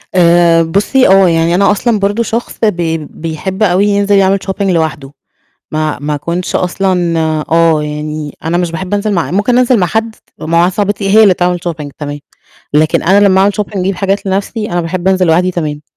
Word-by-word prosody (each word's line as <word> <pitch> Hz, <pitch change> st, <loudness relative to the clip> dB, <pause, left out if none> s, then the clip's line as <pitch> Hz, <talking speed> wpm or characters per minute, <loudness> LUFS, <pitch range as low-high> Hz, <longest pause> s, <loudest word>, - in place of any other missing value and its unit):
آآ، 170 Hz, -1 st, +4 dB
بُصّي 205 Hz, +10 st, +1 dB
آه 190 Hz, -1 st, +5 dB
يعني 165 Hz, +1 st, +1 dB
أنا 200 Hz, +2 st, +3 dB
أصلًا 215 Hz, +1 st, 0 dB
برضه 205 Hz, +4 st, 0 dB
شخص 230 Hz, +2 st, -4 dB
بي 170 Hz, -6 st, 0 dB
بيحب 165 Hz, +6 st, -5 dB
أوي 195 Hz, +1 st, +2 dB
ينزل 205 Hz, 0 st, +1 dB
يعمل 195 Hz, 0 st, +3 dB
shopping 190 Hz, +1 st, -4 dB
لوحده، 160 Hz, -7 st, -1 dB, 0.6 s
ما 155 Hz, -1 st, -2 dB
ما 150 Hz, +1 st, -3 dB
اكونش 170 Hz, +5 st, -4 dB
أصلًا 180 Hz, -2 st, 0 dB, 0.3 s
آه، 165 Hz, -2 st, +3 dB
يعني 150 Hz, 0 st, -6 dB
أنا 165 Hz, +2 st, -1 dB
مش 175 Hz, -2 st, -1 dB
باحب 180 Hz, +4 st, -5 dB
أنزل 205 Hz, +1 st, -1 dB
مع 170 Hz, -2 st, -1 dB
ممكن 210 Hz, +6 st, +1 dB
أنزل 250 Hz, -1 st, +3 dB
مع 180 Hz, -, +1 dB
حد، 220 Hz, +3 st, -2 dB, 0.2 s
ومع 165 Hz, +2 st, -1 dB
واحدة 175 Hz, +2 st, +2 dB
صاحبتي 205 Hz, -1 st, -1 dB
هي 220 Hz, +2 st, +6 dB
اللي 195 Hz, -, +5 dB
تعمل 180 Hz, 0 st, -1 dB
shopping 150 Hz, -3 st, -5 dB
تمام، 145 Hz, -1 st, -6 dB, 0.6 s
لكن 155 Hz, +1 st, +2 dB
أنا 200 Hz, +4 st, +4 dB
لمّا 190 Hz, 0 st, +3 dB
أعمل 200 Hz, +1 st, +3 dB
shopping 210 Hz, -1 st, -4 dB
اجيب 190 Hz, +2 st, -1 dB
حاجات 195 Hz, +1 st, -2 dB
لنَفْسي، 200 Hz, +2 st, -3 dB
أنا 175 Hz, -, 0 dB
باحب 175 Hz, +2 st, -2 dB
أنزل 185 Hz, -1 st, +2 dB
لوحدي 175 Hz, +3 st, +2 dB
تمام. 150 Hz, -4 st, -4 dB
180 Hz, 190 wpm, -12 LUFS, 165-200 Hz, 0.6 s, هي